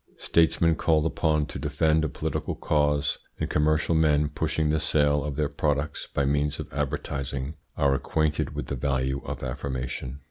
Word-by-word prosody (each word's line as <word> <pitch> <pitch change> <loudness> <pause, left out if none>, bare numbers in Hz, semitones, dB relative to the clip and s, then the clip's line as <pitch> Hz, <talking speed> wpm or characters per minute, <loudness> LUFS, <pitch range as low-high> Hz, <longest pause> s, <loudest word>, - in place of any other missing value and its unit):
Statesmen 85 0 +3
called 80 -2 +2
upon 80 -2 +1
to - - -7
defend 80 +2 +2
a 80 - 0
political - - -3
cause, 75 -2 +1 0.2
and - - -2
commercial 75 +2 +2
men 75 -2 +3
pushing 75 +1 0
the 80 - +2
sale 75 -2 +2
of 75 -1 -3
their 75 0 +1
products 75 +1 -1
by 70 - +1
means 75 +1 0
of - - -7
advertising 70 0 -3 0.2
are 70 -1 +3
acquainted 75 +2 0
with - - -3
the - - -3
value 65 0 -1
of - - -5
affirmation. 65 0 -4
75 Hz, 165 wpm, -26 LUFS, 70-75 Hz, 0.2 s, Statesmen